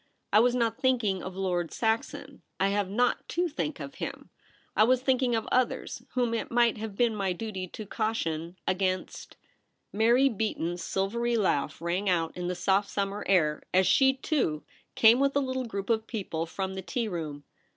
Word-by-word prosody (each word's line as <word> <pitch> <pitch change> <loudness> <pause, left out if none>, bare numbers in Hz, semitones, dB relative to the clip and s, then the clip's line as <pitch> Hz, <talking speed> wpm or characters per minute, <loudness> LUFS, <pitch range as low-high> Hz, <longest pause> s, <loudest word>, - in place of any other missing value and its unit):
' - - -41
I 210 - +7
was 245 +2 +4
not 230 -2 0
thinking 235 -8 +1
of 185 0 -7
Lord 180 -3 -1
Saxon. 225 0 -2 0.2
I 195 - +3
have 200 -1 0
not 245 +5 0
to 350 +1 0
think 300 -2 -3
of 275 - -7
him. - - -6 0.4
I - - +6
was 255 +2 +3
thlnklno^ 255 -3 +2
of 225 - -4
others 255 0 0
— - - -33
whom 245 -2 +1
it 230 - -2
might 235 -2 +2
have 215 -2 -5
been 235 0 +2
my 195 -3 0
duty 190 -1 -5
to 215 +4 -8
caution 180 -6 -2
— - - -48
against 185 -1 -3 0.3
' - - -49
Mary 235 +5 +4
Beaton's 190 -7 -2
silvery 235 +5 0
laugh 165 -9 0
rang 180 +4 -1
out 165 -3 0
in 180 0 -4
the 180 - -2
soft 195 +3 +1
summer 200 +1 -2
air 155 -6 +3
as 190 0 +5
she, 265 +6 +5
too, 260 - -1 0.3
came 230 +2 +6
with 275 0 +2
a - - +4
little 260 -1 -2
group 200 0 -3
of 220 -1 0
people 170 -7 -3
from 190 +3 -4
the 190 - -5
tea 230 +5 -2
room. 155 -6 -5
210 Hz, 195 wpm, -28 LUFS, 185-240 Hz, 0.4 s, I